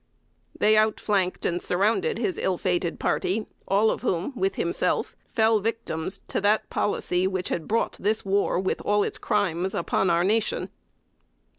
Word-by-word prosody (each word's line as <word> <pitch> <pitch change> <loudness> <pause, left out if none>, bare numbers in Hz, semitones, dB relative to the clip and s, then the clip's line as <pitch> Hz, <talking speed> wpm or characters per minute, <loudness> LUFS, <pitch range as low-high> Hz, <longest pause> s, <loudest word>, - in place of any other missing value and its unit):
They 215 +1 +4
out 215 0 +3
flanked 190 -3 0
and 175 0 0
surrounded 220 - +1
his 375 - -1
ill 185 -2 0
fated 175 -2 -1
party, 215 +4 0 0.2
all 205 +3 +3
of - - -4
whom 190 +2 -1
with 385 +6 0
himself - - -1 0.2
fell 220 -1 +3
victims 200 -5 -3
to - - -1
that 210 +2 +1
policy 185 -2 0
which 185 -1 -3
had 165 - -3
brought 230 +2 0
this 215 +2 0
war, 195 -2 +1
with 190 - -1
all 205 0 +2
its - - -3
crimes, 190 -3 0
upon 190 - +1
our 170 0 +3
nation. 215 +4 0
200 Hz, 160 wpm, -25 LUFS, 180-220 Hz, 0.2 s, They